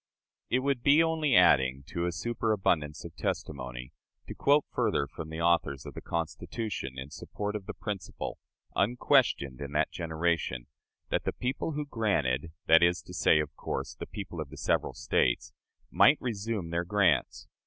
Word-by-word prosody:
It 130 - +2
would 140 -3 0
be 145 +5 +6
only 160 -5 +1
adding 65 -7 +5
to 85 0 -1
a - - 0
superabundance 95 -7 0
of - - -9
testimony 65 -3 -4 0.3
to - - -6
quote 145 +1 +3
further 70 - +1
from 80 +3 -8
the 80 +1 -5
authors 85 -5 +1
of 70 - -8
the - - -7
Constitution 85 - -4
in 65 +3 -7
support 105 +6 -5
of 100 -2 -5
the - - -5
principle, 100 -4 -5 0.4
unquestioned 75 - +2
in 70 0 -6
that 75 - +1
generation, 80 -6 -1 0.4
that - - 0
the - - 0
people 130 +5 -2
who 150 0 -3
granted 85 - 0
that 80 +1 +7
is 85 +1 +3
to 90 - -11
say, 80 -2 +4
of 75 -1 -3
course, - - -4
the - - -8
people 95 -5 -6
of 75 - -6
the - - -11
several - - 0
States - - 0 0.4
might 150 - +6
resume 105 -6 -3
their 85 +1 0
grants. 90 -4 +1
85 Hz, 165 wpm, -29 LUFS, 75-110 Hz, 0.4 s, that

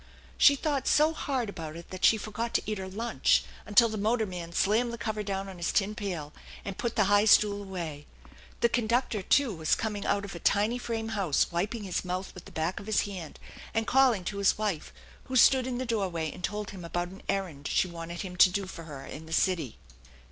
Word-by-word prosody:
She 285 - +7
thought 280 -1 -1
so 305 +2 +4
hard 265 -6 -2
about 165 -6 -7
it 170 0 -11
that 185 0 -7
she 225 - +6
forgot 225 +2 -4
to - - +2
eat 215 -2 -3
her 190 - -5
lunch 230 +5 +1 0.2
until 230 +3 +6
the 215 -2 -4
motorman 200 -6 -1
slammed 220 +7 +2
the 235 - -5
cover 215 -2 -3
down 195 -1 -3
on 190 -2 -9
his 170 0 -1
tin 205 +1 +1
pail 180 -9 -5 0.3
and 195 - -4
put 235 -2 -2
the 215 - +4
high 205 +1 +4
stool 205 -1 +5
away. 170 -7 -6 0.5
The 235 - +4
conductor, 235 -2 0
too, 260 +4 +3
was 160 -3 +1
coming 210 -2 -3
out 200 0 0
of 200 - -8
a 170 - -7
tiny 210 +7 +2
frame 225 -2 -3
house, 195 -10 +1
wiping 205 +6 -2
his 185 -3 -2
mouth 185 +1 -4
with 180 - -11
the - - -12
back 160 +3 -2
of 205 - -11
his 215 - +2
hand 185 -6 -7 0.4
and 225 0 +1
calling 255 -7 +4
to 200 +3 -4
his 200 - +3
wife, 205 -7 -2 0.3
who 260 - -5
stood 255 +1 +6
in 250 -1 -2
the 255 - -2
doorway 185 -9 -1
and 180 - -11
told 210 0 -3
him 190 -3 -9
about 175 +1 -3
an 190 +2 -12
errand 165 -7 -2
she - - +2
wanted 170 0 -6
him 185 -3 -6
to 185 - +8
do 195 +2 -2
for 170 -3 -9
her 140 -4 -8
in 160 +2 -9
the - - -11
city. 165 - +1
200 Hz, 225 wpm, -29 LUFS, 175-225 Hz, 0.5 s, to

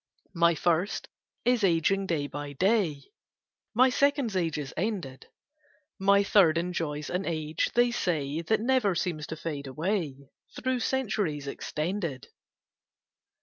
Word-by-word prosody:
My 170 -1 +4
First 175 +5 0 0.4
is 245 -2 +3
ageing 190 +2 +2
day 155 -5 0
by 145 0 -6
day: 185 - +1 0.7
My 255 +2 +5
Second's 280 -5 +1
age 165 -4 0
is 145 -3 -5
ended: 175 -9 -3 0.7
My 200 +1 +4
Third 180 -6 +5
enjoys 165 -4 -2
an 180 +2 -1
age, 155 -3 -1
they 240 0 +4
say, 160 -9 -1
That 215 +6 +1
never 235 -6 +2
seems 160 -4 -2
to 160 - -5
fade 150 -4 -5
away, 150 -2 -3 0.2
Through 260 0 -1
centuries 205 - -1
extended. 155 0 -3
170 Hz, 125 wpm, -28 LUFS, 150-205 Hz, 0.7 s, My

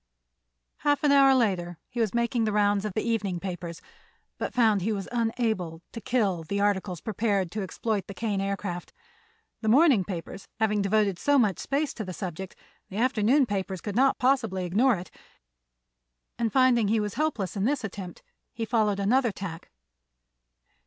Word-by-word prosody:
Half 290 0 +1
an 295 - +4
hour 275 -1 +6
later 180 -8 0
he 245 - -6
was 220 -4 +1
making 235 -1 +1
the 215 - 0
rounds 205 -1 +2
of 210 - -3
the 215 - -1
evening 205 -6 -1
papers, 175 -2 -6 0.6
but - - -2
found 220 -5 +3
he 215 +5 0
was 200 -3 -3
unable 225 -8 -1
to 230 - -7
"kill" 205 -8 0
the 200 +6 -3
articles 190 -4 0
prepared 205 -4 -1
to 215 - -3
exploit 205 +1 -2
the 200 - -8
Kane 205 -1 -1
Aircraft. 195 -3 -4 0.7
The 220 - -3
morning 265 - +5
papers 180 +1 -7
having 210 -2 +2
devoted 200 -2 +1
so 285 0 +3
much 210 - +2
space 285 +2 -1
to 220 - -5
the 185 -2 -6
subject, 185 0 -6 0.3
the 195 - -7
afternoon 255 +3 +3
papers 195 -3 -3
could 205 +3 -5
not 265 +3 +3
possibly 225 -8 +1
ignore 225 +8 +3
it, 175 -1 -8 1.3
and 230 -2 0
finding 255 -4 +4
he 220 +2 +2
was 210 -1 -2
helpless 235 - -1
in 195 0 0
this 275 0 0
attempt 190 -4 -7 0.3
he 225 - -3
followed 215 -3 +1
another 235 +4 +2
tack. 180 -4 -7
210 Hz, 170 wpm, -27 LUFS, 190-235 Hz, 1.3 s, hour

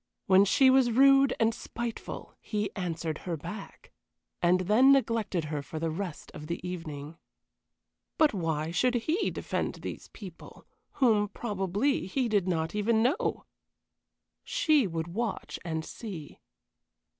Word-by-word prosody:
When 190 +1 +6
she 260 +6 +5
was 260 -2 +5
rude 275 +2 +5
and 225 0 +3
spiteful 235 0 -6
he 210 -2 -2
answered 165 -4 -3
her 170 -3 -4
back, 185 +7 -9 0.5
and 180 +1 +4
then 220 +9 +5
neglected 230 -9 +1
her 150 -1 -3
for 155 - -8
the 165 0 -1
rest 175 -1 -6
of 150 - -9
the 170 - -3
evening. 160 -3 -7 1.0
But 310 -4 +4
why 160 -4 -1
should 250 +8 +2
he 310 - 0
defend - - -3
these - - -7
people, 185 -6 -12 0.3
whom, 220 -6 +3
probably, 205 +4 -1
he 255 +5 0
did 205 -4 +1
not 160 -2 -1
even 220 +2 +2
know? 255 +4 0 1.0
She 310 - +2
would 165 -2 -3
watch 220 +4 -3
and 160 -2 -3
see. 185 -10 -8
200 Hz, 135 wpm, -29 LUFS, 165-240 Hz, 1.0 s, When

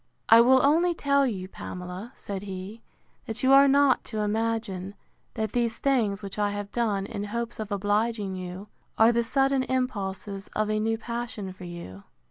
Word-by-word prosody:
I 225 +1 +9
will 260 +2 +5
only 335 +4 +3
tell 280 -2 +2
you, 190 -6 -4
Pamela, 185 +4 -7
said 195 -2 -6
he, 195 +3 -7 0.5
that 225 +2 -5
you 265 +1 +5
are 275 +1 +8
not 275 -1 +4
to 215 -2 -3
imagine, 210 -3 -2 0.4
that 220 -2 -2
these 235 -2 0
things, 220 -7 +1
which 195 +1 -6
I 205 0 +2
have 205 0 -5
done, 210 -5 0
in 205 +1 -5
hopes 235 +2 -4
of 215 -1 -5
obliging 205 0 0
you, 185 +2 -7 0.3
are 225 +1 +6
the 235 0 +1
sudden 270 +2 +2
impulses 205 -6 -3
of 215 0 0
a 215 - +1
new 225 +1 0
passion 230 -4 -5
for 185 -1 -11
you. 170 - -8
215 Hz, 175 wpm, -27 LUFS, 195-240 Hz, 0.5 s, I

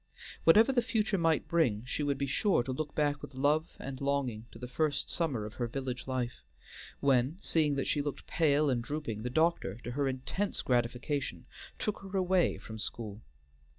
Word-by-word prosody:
Whatever 220 +10 +7
the 250 -2 +3
future 220 -4 0
might 165 -1 +2
bring, 125 -10 +2
she 130 - -2
would 145 -1 +1
be 140 - 0
sure 140 - +2
to 130 - -3
look 145 +3 -4
back 145 -1 +1
with 135 - -9
love 150 +4 +1
and 135 -1 -6
longing 135 -5 -1
to - - -13
the 125 +1 -6
first 150 +3 0
summer 140 -11 -1
of 105 - -7
her 120 - -2
village 130 +1 -4
life, 125 -2 -2 0.6
when, 135 +3 +3
seeing 155 -7 +2
that 135 - -1
she 145 - +1
looked 145 -1 -4
pale 150 -2 +3
and 125 -4 +1
drooping, 140 -6 -4
the 125 - -2
doctor, 160 - +1
to 120 - -4
her 140 +2 0
intense 135 +10 -2
gratification, 125 +3 -1 0.3
took 210 - -2
her 195 0 -4
away 185 -1 +3
from 110 0 -9
school. 105 -1 -5
140 Hz, 185 wpm, -32 LUFS, 125-160 Hz, 0.6 s, Whatever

